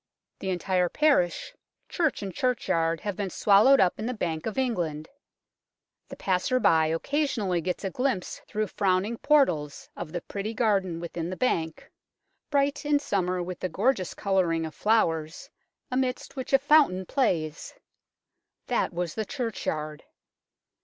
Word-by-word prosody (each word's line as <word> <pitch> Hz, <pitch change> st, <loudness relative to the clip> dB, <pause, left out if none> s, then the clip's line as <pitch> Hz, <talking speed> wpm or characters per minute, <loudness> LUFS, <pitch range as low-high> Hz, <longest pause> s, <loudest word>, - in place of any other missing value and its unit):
The 190 Hz, -, -4 dB
en 185 Hz, -, 0 dB
tire 180 Hz, 0 st, +1 dB
parish, 285 Hz, -, +1 dB, 0.3 s
church 320 Hz, -, -1 dB
and 195 Hz, -2 st, -5 dB
churchyard 165 Hz, -10 st, 0 dB
have 205 Hz, -2 st, -3 dB
been 200 Hz, -1 st, -3 dB
swallowed 210 Hz, +9 st, +5 dB
up 180 Hz, -2 st, +2 dB
in 220 Hz, -, -3 dB
the 250 Hz, -, -2 dB
Bank 165 Hz, -5 st, -3 dB
of 220 Hz, -, -4 dB
England. 175 Hz, -, -1 dB, 1.0 s
The -, -, -9 dB
passer 190 Hz, +7 st, 0 dB
by 160 Hz, -8 st, +4 dB
occasionally 200 Hz, -, 0 dB
gets 180 Hz, +4 st, -3 dB
a 195 Hz, -, -2 dB
glimpse 250 Hz, -7 st, -2 dB
through 215 Hz, 0 st, -1 dB
frowning 200 Hz, +3 st, 0 dB
portals 175 Hz, -, +1 dB
of 165 Hz, -3 st, -6 dB
the 175 Hz, -, -4 dB
pretty 210 Hz, +5 st, -5 dB
garden 195 Hz, -7 st, +1 dB
within 170 Hz, 0 st, -5 dB
the 185 Hz, -, -5 dB
Bank, 165 Hz, -10 st, -1 dB, 0.6 s
bright 280 Hz, 0 st, +1 dB
in 295 Hz, 0 st, +3 dB
summer 185 Hz, -9 st, -1 dB
with 180 Hz, 0 st, -6 dB
the 185 Hz, -, -2 dB
gorgeous 200 Hz, +1 st, 0 dB
colouring 175 Hz, -5 st, +1 dB
of 160 Hz, -, -7 dB
flowers, 180 Hz, -, 0 dB, 0.4 s
amidst 255 Hz, +1 st, -2 dB
which 260 Hz, -2 st, -5 dB
a 270 Hz, -, +7 dB
fountain 275 Hz, -10 st, +4 dB
plays. 170 Hz, -, -1 dB, 0.9 s
That -, -, 0 dB
was 170 Hz, -1 st, -3 dB
the 220 Hz, -, -2 dB
churchyard. 160 Hz, -, -4 dB
190 Hz, 145 wpm, -27 LUFS, 170-250 Hz, 1.0 s, a